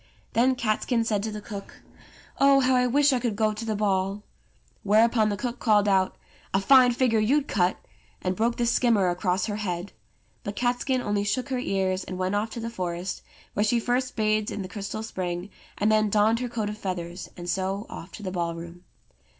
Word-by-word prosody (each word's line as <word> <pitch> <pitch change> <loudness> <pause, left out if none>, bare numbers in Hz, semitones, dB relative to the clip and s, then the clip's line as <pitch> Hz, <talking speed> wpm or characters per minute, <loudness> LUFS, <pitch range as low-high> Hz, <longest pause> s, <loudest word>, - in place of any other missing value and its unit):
Then 255 +3 +3
Catskin 230 +1 0
said 215 -3 0
to 220 +1 -3
the 210 0 -6
cook, 205 -2 -9 0.6
"Oh, 275 0 +6
how 260 0 +3
I 250 0 +3
wish 280 +3 +4
I 255 - +2
could 235 -3 -1
go 215 0 +1
to 215 +2 -6
the 220 -1 -1
ball!" 200 0 0 0.6
Whereupon 220 +1 +4
the 205 - -2
cook 245 +1 -4
called 210 -3 +3
out: 190 -2 +2 0.4
"A - - +4
fine 255 +4 +6
figure 235 -3 +2
you'd 275 +7 +2
cut!" 180 -2 +1 0.4
and 185 0 -2
broke 230 +4 +1
the 240 - +1
skimmer 230 -5 +3
across 180 +1 0
her 205 -1 -3
head. 180 -2 -4 0.5
But 205 - -5
Catskin 250 +2 0
only 205 -1 0
shook 230 +7 -1
her 260 -2 -1
ears, 190 -5 0
and 185 - -6
went 185 +1 -1
off 210 +2 0
to 230 - -6
the 230 0 -4
forest, 180 -2 -4 0.3
where 205 - +1
she 235 +2 +2
first 250 +2 -1
bathed 215 -1 +1
in 205 - -4
the - - -6
crystal 200 +2 -5
spring, 180 -2 -4 0.3
and 210 +2 +2
then 215 -1 +3
donned 215 +2 +3
her 250 -1 -3
coat 220 -3 -2
of 210 0 -7
feathers, 180 -2 -5
and 175 0 -7
so 190 +3 -1
oflf 170 - -9
to 210 - -9
the 185 - -3
ballroom. 170 0 -4
210 Hz, 205 wpm, -26 LUFS, 190-235 Hz, 0.6 s, Oh